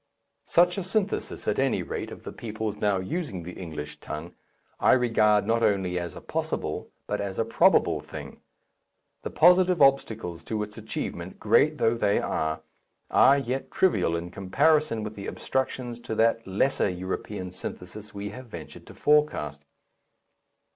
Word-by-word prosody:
Such 175 +3 +4
a - - -3
synthesis, 200 +2 -2
at - - +1
any - - +1
rate, - - -4
of - - -10
the - - -6
peoples 110 -2 -4
now 105 -2 +1
using 95 - -3
the 90 - -7
English 75 -5 -7
tongue, 75 +3 -7 0.5
I - - +5
regard 110 -4 +3
not 115 0 +1
only 95 -5 +1
as 85 -1 -6
a - - -9
possible, - - -3 0.2
but 105 - -2
as 100 -2 -4
a 115 - +1
probable, 115 - +4
thing. - - -9 0.8
The - - -4
positive 180 +1 +5
obstacles 110 - +2
to 110 -1 -2
its 105 0 -8
achievement, 110 0 -5
great - - +3
though 115 - +3
they 105 -3 +2
are, 80 0 -1 0.5
are 140 +1 +6
yet 135 0 -3
trivial 95 - +2
in 85 +1 -4
comparison 140 - +2
with 105 0 -5
the 100 -2 -7
obstructions 125 -2 -2
to 110 - -5
that 115 0 +2
lesser 100 +4 +1
European 95 +1 -4
synthesis 100 +4 -8
we 100 0 -5
have 130 +4 -10
ventured 85 -8 -10
to - - -12
forecast. 145 - +1
105 Hz, 155 wpm, -27 LUFS, 95-130 Hz, 0.8 s, are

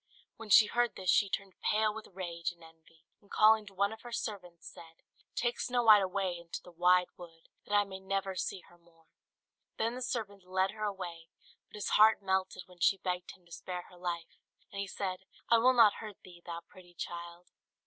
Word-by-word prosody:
When 225 -1 -10
she 215 - +8
heard 240 +2 0
this 185 -2 +1
she 200 - +3
turned 195 -1 -5
pale 215 0 +2
with 220 0 -8
rage 170 -3 -3
and 170 -1 -19
envy; 160 0 -20 0.2
and 200 - -25
calling 215 0 +5
to 195 - -13
one 200 +3 +1
of 220 - -12
her 240 - -10
servants 185 -7 -5
said, 165 0 -13 0.3
"Take 240 0 -1
Snow 245 -1 0
White 215 -3 +8
away 185 -2 -1
into 170 -1 -7
the 180 - -13
wide 180 +1 +4
wood, 165 -2 -14 0.2
that 205 - 0
I 205 - +5
may 190 -1 -8
never 195 0 -2
see 185 +1 -3
her 175 0 -21
more." 165 -1 -27 0.7
Then 230 +1 0
the 250 - -6
servant 205 -6 -4
led 185 +1 0
her 215 0 -4
away; 175 -5 -5 0.4
but - - -14
his 210 - -3
heart 220 +1 +6
melted 190 -1 -1
when 180 -1 -19
she 195 +3 +4
begged 180 -1 -4
him 180 - -31
to 170 - -23
spare 180 +1 -6
her 180 - -15
life, 170 -2 -5 0.3
and 200 - -6
he 200 - -2
said, 190 -1 -4 0.3
"I 230 - +7
will 255 +3 +5
not 225 -4 +7
hurt 215 -3 -8
thee, 175 -2 -14
thou 170 -1 -6
pretty 175 -1 -17
child." 170 +1 -7
190 Hz, 210 wpm, -32 LUFS, 175-210 Hz, 0.7 s, she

